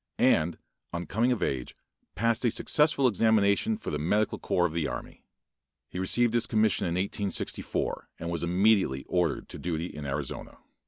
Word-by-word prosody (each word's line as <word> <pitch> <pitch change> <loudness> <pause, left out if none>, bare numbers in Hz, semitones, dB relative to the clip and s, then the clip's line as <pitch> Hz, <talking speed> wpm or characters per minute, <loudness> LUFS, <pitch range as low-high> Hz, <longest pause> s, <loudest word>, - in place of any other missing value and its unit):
and, 80 +2 +3 0.3
on 85 0 -4
coming 115 +7 +1
of 120 - 0
age 65 -2 -2 0.4
passed 115 +5 +1
a 120 - +4
successful 145 +3 +3
examination 110 - +3
for 225 - -6
the 75 - -2
medical 105 +7 +1
corps 90 - +1
of 80 - -1
the 80 -3 0
army. - - -7 0.7
He 90 - -5
received 115 +5 +2
his 120 0 +2
commission 110 -4 +2
in 85 - -1
1864, 100 +1 -2
and 85 +1 -5
was 85 -1 -2
immediately 90 -6 +2
ordered 85 -5 0
to - - -8
duty 85 -1 -2
in 75 -4 -7
Arizona. 70 -1 -5
95 Hz, 165 wpm, -28 LUFS, 85-110 Hz, 0.7 s, a